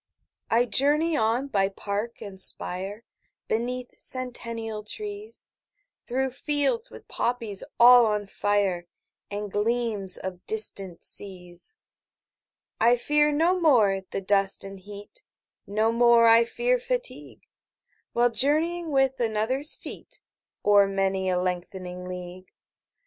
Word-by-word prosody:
20 235 +2 +4
I - - -3
journey 300 +6 +3
on 230 +2 +1
by 195 -7 +1
park 205 +4 -5
and 190 -2 -3
spire, 195 +5 +2 0.4
Beneath 245 +2 -3
centennial 230 -4 -4
trees, 415 - -7 0.6
Through 265 +2 -1
fields 295 - 0
with - - -14
poppies 230 -5 -2 0.2
all 245 0 +8
on 210 -1 -1
fire, 195 -3 -1 0.4
And 205 0 -5
gleams 210 -3 -1
of 185 -1 -7
distant 195 -5 -1
seas. 180 - -5 1.0
I 240 +2 +4
fear 295 +4 +2
no 335 +5 +2
more 220 - +3
the 195 - -3
dust 195 0 +2
and 195 0 -8
heat, 205 - -10 0.4
25 - - -50
No 220 +1 +2
more 235 0 +5
I 230 +1 +6
fear - - 0
fatigue, - - -2 0.7
While 240 0 +2
journeying 315 +8 +2
with 270 -2 +1
another's 235 +6 +1
feet - - -7 0.5
O'er 205 -1 +5
many 195 -1 -1
a 180 - +1
lengthening 180 0 -4
league. 180 0 -8
225 Hz, 120 wpm, -25 LUFS, 195-265 Hz, 1.0 s, all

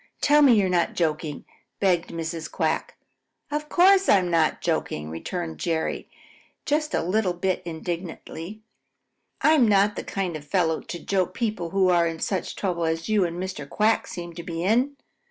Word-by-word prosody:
Tell 295 +1 +5
me 275 -4 +7
you're 200 -3 +3
not 180 -2 +1
joking," 155 -3 -2 0.3
begged 180 -4 +2
Mrs. 165 0 -5
Quack. - - -1 0.5
"Of 300 0 -3
course 385 +2 +5
I'm 185 -3 +4
not 165 -2 +2
joking," 80 - -2
returned 160 - -5
Jerry 165 -2 -2 0.6
just 305 +1 0
a - - 0
little 185 +1 +1
bit 185 +1 -1
indignantly, 170 +3 -6 0.8
"I 310 - +5
am 265 -7 +5
not 205 0 +3
the - - -4
kind 185 -4 -3
of 155 - -5
a 145 - -19
fellow 160 -1 +1
to 175 - -7
joke 185 0 -1
people 215 -8 -2
who 190 +1 +2
are 170 -1 +4
in 165 0 -4
such 190 +3 -2
trouble 175 -4 -1
as 165 +3 -2
you 210 -4 +3
and 170 0 -4
Mr. 185 -7 -5
Quack 215 +1 +2
seem 175 -1 -7
to 170 - -7
be 170 -1 -4
in. 245 +9 +2
180 Hz, 175 wpm, -25 LUFS, 165-210 Hz, 0.8 s, me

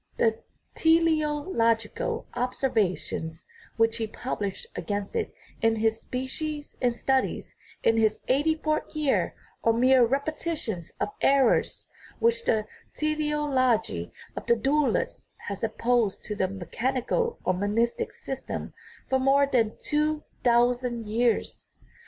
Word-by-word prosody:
The 225 -1 +2 0.3
teleological 300 - +1
observa 245 -6 +1
tions 160 0 -6 0.3
which 225 0 +3
he 225 -1 -1
published 205 -4 -4
against 205 -1 -3
it 450 - -1 0.3
in 225 0 +3
his 220 0 +1
Species 290 +4 -4
and 245 - +3
Studies 265 +2 -1 0.3
in 225 - +4
his 220 -1 +2
eighty 290 +5 +3
fouth 310 0 -2
year 300 -3 +1 0.3
are 230 - +4
mere 255 +2 +5
repetitions 275 - -2
of - - 0
errors 270 -3 +3 0.3
which 470 +1 +2
the 215 -1 +2 0.3
teleology 290 - 0 0.2
of - - -6
the 235 - +5
dualists 275 +6 0 0.2
has 200 +1 -5
opposed 225 -1 +1
to 210 - -4
the 190 - +1
mechanical 250 - -1
or 185 - +3
monistic 230 - 0
system - - -6 0.3
for 265 - +2
more 275 +2 +4
than 230 -6 +1
two 300 +1 +1 0.2
thousand 240 -1 +2
years. 230 +2 0
245 Hz, 120 wpm, -27 LUFS, 225-295 Hz, 0.3 s, mere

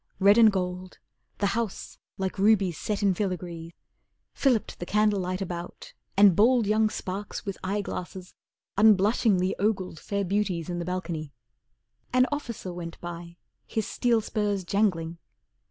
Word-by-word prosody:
Red 200 +3 +6
and 220 -2 +8
gold, 180 -1 -4 0.4
The 205 - 0
house, 230 -4 -4 0.2
like 190 0 -3
rubies 200 -4 +3
set 210 -1 -2
in 195 -2 +4
filigree, 175 -3 -4 0.6
Filliped 250 -6 +1
the 175 - -4
candlelight 200 -3 +1
about, 175 -1 -7 0.2
and 200 -3 +7
bold 235 +2 +4
Young 215 +1 +3
sparks 200 0 -5
with 195 -2 -3
eye 200 +2 -1
glasses, 185 -1 -7 0.5
unblushingly 205 -2 +4
Ogled 190 -5 -1
fair 200 -1 -2
beauties 185 -3 -1
in 175 - -3
the 170 - -3
balcony. 170 -5 -4 0.8
An 255 0 +4
officer 235 -10 -4
went 170 -1 -7
by, 170 0 -8 0.3
his 220 -2 -2
steel 235 -2 +1
spurs 205 -3 -1
jangling. 175 -4 0
195 Hz, 140 wpm, -27 LUFS, 180-210 Hz, 0.8 s, and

